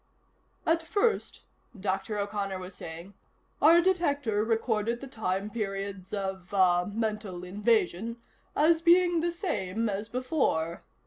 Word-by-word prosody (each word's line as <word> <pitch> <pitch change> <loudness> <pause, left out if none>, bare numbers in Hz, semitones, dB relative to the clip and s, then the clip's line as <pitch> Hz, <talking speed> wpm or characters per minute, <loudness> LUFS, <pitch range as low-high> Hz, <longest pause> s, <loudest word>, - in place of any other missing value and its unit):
"At 330 +1 +3
first," 410 +7 0 0.4
Dr. 195 +2 -2
O'Connor 200 -1 -2
was 185 +1 -8
saying, 170 +3 -8 0.5
"our 330 +3 +7
detector 285 - +1
recorded 225 0 0
the 275 - -7
time 210 -5 -2
periods 195 -3 -4
of 190 -2 -4
ah 180 -2 +4
mental 210 -4 -3
invasion 210 +2 0 0.4
as 320 +2 +4
being 345 0 +5
the 340 +2 +1
same 230 - -2
as 205 +2 -3
before. 245 - 0
210 Hz, 120 wpm, -29 LUFS, 190-285 Hz, 0.5 s, our